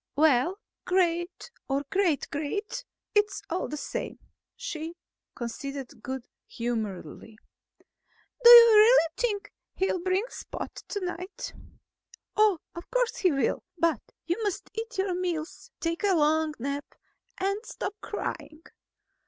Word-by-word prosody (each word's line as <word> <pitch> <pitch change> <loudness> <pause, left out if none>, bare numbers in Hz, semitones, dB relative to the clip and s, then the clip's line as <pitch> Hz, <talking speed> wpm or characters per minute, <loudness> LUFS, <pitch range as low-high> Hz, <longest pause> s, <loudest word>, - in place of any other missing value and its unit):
"Well, 300 +4 +4 0.3
great 345 +3 0 0.2
or 275 +1 +1
great 375 -7 +2
great, 405 +12 -3 0.3
it's 415 -1 +2
all 355 - -1
the 300 - -5
same," - - -4 0.4
she 335 -9 -5 0.4
conceded 260 +1 -6
good 260 0 -5 0.2
humoredly. 220 -2 -4 1.1
"Do 475 - +10
you 475 -1 +12
really 425 -5 +7
think 415 -4 -2 0.2
he'll 375 -1 +1
bring 375 +4 +1
Spot - - -7
tonight?" 365 -1 -5 0.8
"Of 380 -5 +1
course - - +1
he 370 -4 +3
will. 275 -2 +1 0.2
But 330 -8 +2 0.2
you 345 +7 -1
must 410 -4 -3
eat 455 +2 -5
your 380 -1 +1
meals, 350 -3 -3
take 335 +3 -2
a 395 -2 +4
long 310 0 +2
nap, 280 +4 -4 0.4
and 395 +3 -1
stop 390 -4 -5
crying." 310 0 -5
345 Hz, 120 wpm, -28 LUFS, 295-405 Hz, 1.1 s, you